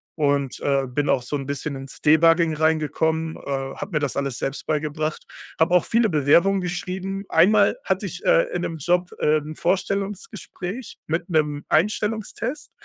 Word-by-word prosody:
Und, 140 -3 0
äh, 140 -1 +1
bin 145 +3 -1
auch 125 - +3
so 145 +4 -3
'n 135 - -6
bisschen 140 0 -3
ins 135 0 -10
Debugging 165 +1 +4
reingekommen, 160 +1 0
äh, - - -10 0.3
habe 195 0 -6
mir 150 - +2
das 145 -2 -2
alles 140 -3 -2
selbst 135 +1 -4
beigebracht, 155 0 -2 0.4
habe 170 +2 +3
auch 180 - +4
viele 230 -1 +2
Bewerbungen 170 +6 +4
geschrieben. 190 +2 -4
Einmal 185 - +4
hatte - - 0
ich, - - -8
äh, - - +3
in - - -1
'nem 165 - -3
Job, 175 +4 +1
ähm, 150 0 +1
'n - - -8
Vorstellungsgespräch 195 +3 -3
mit 170 +3 -2
'nem 150 -3 0
Einstellungstest. 215 - -1
160 Hz, 165 wpm, -23 LUFS, 145-190 Hz, 0.4 s, Debugging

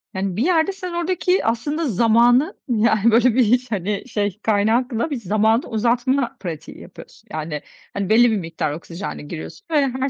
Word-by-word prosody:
Yani 190 -1 -2
bir 230 - +1
yerde 350 +1 +2
sen 365 -2 -7
oradaki 360 +2 0
aslında 290 +8 -1
zamanı, 235 - +3 0.2
yani, 225 -1 +3
böyle, 235 +1 +4
bir 255 - +5
hiç 245 +2 +1
hani, 200 0 -2
şey 205 -4 -2
kaynakla 225 +5 +1
bir 290 - -2
zamanı 220 +1 +1
uzatma 245 +3 0
pratiği 165 -5 -7
yapıyorsun - - -14
yani. 155 -1 -4 0.3
Hani, 200 -2 -3
belli 235 +2 +5
bir 215 - +1
miktar 165 -4 -3
oksijenle 165 +4 -7
giriyorsun 160 +1 -9
ve 290 -3 +3
her 260 +1 -2
230 Hz, 165 wpm, -21 LUFS, 200-260 Hz, 0.3 s, bir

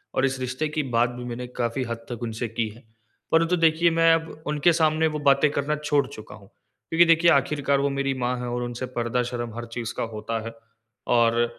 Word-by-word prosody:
और 130 - +3
इस 135 0 -1
रिश्ते 130 +4 -2
की 150 0 -1
बात 120 +1 +3
भी 125 0 -8
मैंने 125 +1 -5
काफ़ी 125 +1 -2
हद 115 -1 -6
तक 120 0 -5
उनसे 115 +1 -3
की 115 0 -2
है। 110 +4 -15 0.5
परंतु 165 +2 +3
देखिए 165 +1 +4
मैं 165 0 +5
अब 160 -1 -3
उनके 150 +3 +3
सामने 160 0 +2
वो - - -2
बातें 140 +1 +4
करना 145 +1 -1
छोड़ 150 -2 +1
चूका 120 -6 -11
हूँ। 100 -2 -16 0.4
क्योंकि 165 +1 +5
देखिए 165 0 +5
आखिरकार 140 -1 +2
वो 140 +1 +1
मेरी 140 0 -1
माँ 125 0 0
है 125 - -4
और 120 0 -2
उनसे 120 +1 -4
पर्दा 120 +1 0
शर्म 120 -2 -4
हर 120 0 -5
चीज़ 115 -2 -4
का - - -1
होता 115 +1 -3
है। 115 - -6 0.6
और 115 0 +3
130 Hz, 215 wpm, -25 LUFS, 120-150 Hz, 0.6 s, मैं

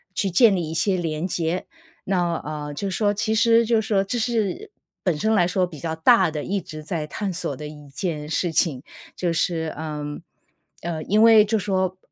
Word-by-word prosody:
去 200 - 0
建 205 +4 +5
立 165 -3 -2
一 - - -4
些 190 +3 +1
连 160 -1 -2
接。 170 0 -2 0.4
那 175 -3 +1
呃， 150 -1 -5
就 195 +6 -3
说 205 +1 +1
其 215 +1 -1
实 230 +1 +4
就 230 0 +3
说 205 -2 +1
这 235 +5 -2
是 235 - -1 0.3
本 175 -5 0
身 220 +6 +1
来 180 -5 +4
说 185 0 +1
比 165 -4 -10
较 160 0 -3
大 160 0 +5
的， 155 -1 -4
一 200 +1 -1
直 155 -3 -9
在 155 -2 -3
探 200 +5 -3
索 155 -5 -3
的 150 - -8
一 150 -1 -12
件 150 0 -4
事 170 +1 0
情， 145 -4 +1 0.3
就 175 -2 -1
是 165 -1 -1
嗯， 150 -1 -5 0.6
呃， 165 -2 -3
因 210 +2 +2
为 220 -2 +7
就 220 +2 +1
说 190 -2 -1
180 Hz, 215 characters per minute, -23 LUFS, 155-205 Hz, 0.6 s, 为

